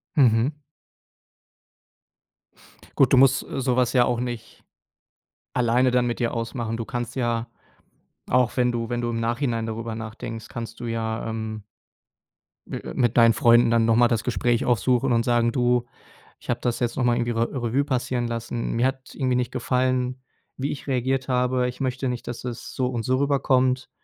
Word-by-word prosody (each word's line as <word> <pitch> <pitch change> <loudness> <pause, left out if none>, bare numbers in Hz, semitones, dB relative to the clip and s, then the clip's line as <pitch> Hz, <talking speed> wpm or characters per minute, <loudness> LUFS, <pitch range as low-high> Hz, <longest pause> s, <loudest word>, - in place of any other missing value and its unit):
Mhm. 130 0 +3 2.4
Gut. 135 -2 +4
Du 130 - +7
musst, 130 0 +5
äh, 135 - -5
sowas 125 -1 +1
ja 125 -2 +5
auch 120 -1 0
nicht 120 -2 -6 0.9
alleine 125 +1 +2
dann 125 -1 +2
mit 120 - -2
dir 120 -1 -1
ausmachen. 115 0 -3
Du 115 - -4
kannst 120 -1 -4
ja 120 -2 -1 0.8
auch 125 0 +2
wenn 125 -1 +3
du 115 -1 -3
wenn 120 0 -2
du 120 0 -1
im 115 - -2
Nachhinein 115 0 -1
darüber 115 0 -4
nachdenkst, 115 0 -7
kannst 115 -2 -7
du 120 - -6
ja, 115 -1 -3
ähm 110 -1 -5 1.0
mi - - -4
äh, - - -7
mit 120 -2 +1
deinen 115 -1 +7
Freunden 120 0 +5
dann 115 -1 +3
noch 115 0 +3
mal 120 +1 +5
das 115 -2 0
Gespräch 120 -1 0
aufsuchen 125 +2 +2
und 115 0 +2
sagen: 120 -1 +2
„Du, 125 -1 +1 0.5
ich - - -17
habe - - 0
das 120 -1 -1
jetzt 120 -1 -1
noch 130 - +1
mal 120 -1 +3
irgendwie 120 0 -1
Re 115 0 0
Revue 130 +1 0
passieren 125 -3 -1
lassen. 115 0 -3
Mir 120 +2 +1
hat 130 0 -6
irgendwie 130 -2 0
nicht 125 -1 -1
gefallen, 130 0 0 0.4
wie 135 +2 -2
ich 145 - -7
reagiert 130 0 0
habe. 125 0 +1
Ich 125 - -10
möchte 130 0 -1
nicht, 125 -1 -5
dass 120 0 -6
es 120 -2 -6
so 130 -1 0
und 120 -3 -3
so 130 +1 +1
rüberkommt. 130 -2 +1
120 Hz, 180 wpm, -24 LUFS, 115-130 Hz, 2.4 s, Du